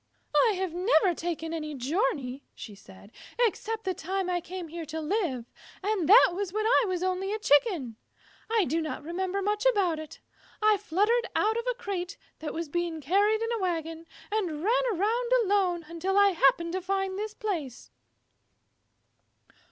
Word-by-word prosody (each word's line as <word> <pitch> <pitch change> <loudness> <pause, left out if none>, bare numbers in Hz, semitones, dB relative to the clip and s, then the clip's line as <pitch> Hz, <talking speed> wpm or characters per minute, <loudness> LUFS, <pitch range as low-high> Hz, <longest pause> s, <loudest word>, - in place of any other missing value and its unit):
"I - - +2
have 370 -3 -2
never 360 -1 +3
taken 330 -1 -4
any 305 -2 -4
journey," 280 - -1
said 200 -1 -12 0.2
she, 485 0 +4
"except 445 +1 -4
the 375 - -1
time 370 +2 -2
I 350 -1 0
came 355 -1 -7
here 335 +1 -6
to 320 +2 -4
live, 310 - -1 0.4
and 395 -5 0
that 440 0 +8
was 385 0 -3
when 430 +2 -1
I 475 +1 +4
was 365 -1 -2
only 370 +1 -1
a 430 - -1
Chicken. 290 - +2 0.5
I 445 -4 +3
do 325 +5 0
not 310 -2 -5
remember 375 +4 -2
much 420 +1 0
about 380 -9 +2
it. 310 -1 -9 0.4
I 430 -1 +4
fluttered 420 +5 +1
out 435 +1 +2
of 470 +1 -3
a - - -1
crate 400 -6 -4 0.2
that 305 -2 -4
was 335 0 -4
being 340 +1 -2
carried 405 +9 +2
in 455 - -2
a 465 - -1
wagon, 330 -3 -3 0.2
and 350 -8 -2
ran - - +3
around 450 +6 0
alone 375 -4 +1
until 345 +4 -2
I 405 0 +7
happened 335 0 +2
to 375 - -1
find 385 +1 -2
this 430 0 -4
place." 320 - -4
370 Hz, 170 wpm, -28 LUFS, 325-420 Hz, 0.5 s, that